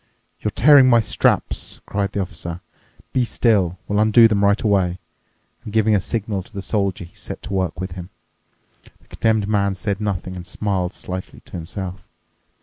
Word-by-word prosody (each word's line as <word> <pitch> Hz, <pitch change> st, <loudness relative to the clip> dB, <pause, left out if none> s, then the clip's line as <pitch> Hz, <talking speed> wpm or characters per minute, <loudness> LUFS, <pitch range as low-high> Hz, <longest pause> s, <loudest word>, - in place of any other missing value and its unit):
"You're -, -, -1 dB
tearing 135 Hz, 0 st, +6 dB
my 120 Hz, -2 st, +6 dB
straps," 110 Hz, -, 0 dB
cried 100 Hz, -1 st, -2 dB
the 100 Hz, -, -1 dB
Officer. 85 Hz, -1 st, -6 dB, 0.5 s
"Be 130 Hz, -, +2 dB
still! 100 Hz, -7 st, +1 dB
We'll 105 Hz, 0 st, 0 dB
undo 110 Hz, +2 st, +6 dB
them 105 Hz, -2 st, +1 dB
right 100 Hz, +1 st, +4 dB
away." 95 Hz, -4 st, +1 dB, 0.7 s
And, 105 Hz, -, -7 dB
giving 110 Hz, 0 st, +3 dB
a 100 Hz, -, +3 dB
signal 105 Hz, -2 st, -2 dB
to 105 Hz, -, -16 dB
the 100 Hz, -2 st, -6 dB
Soldier, 100 Hz, -4 st, -1 dB
he 85 Hz, -, -14 dB
set -, -, -8 dB
to 100 Hz, -, -6 dB
work 95 Hz, -4 st, -1 dB
with 95 Hz, -1 st, -4 dB
him. 90 Hz, 0 st, -8 dB, 0.9 s
The -, -, -27 dB
Condemned 110 Hz, -3 st, +1 dB
Man 100 Hz, -2 st, +1 dB
said 100 Hz, +1 st, -3 dB
nothing 95 Hz, -3 st, -3 dB
and 90 Hz, -1 st, -8 dB
smiled 95 Hz, -2 st, -2 dB
slightly 90 Hz, 0 st, -6 dB
to -, -, -21 dB
himself. 90 Hz, +2 st, -6 dB
100 Hz, 175 wpm, -21 LUFS, 95-110 Hz, 0.9 s, tearing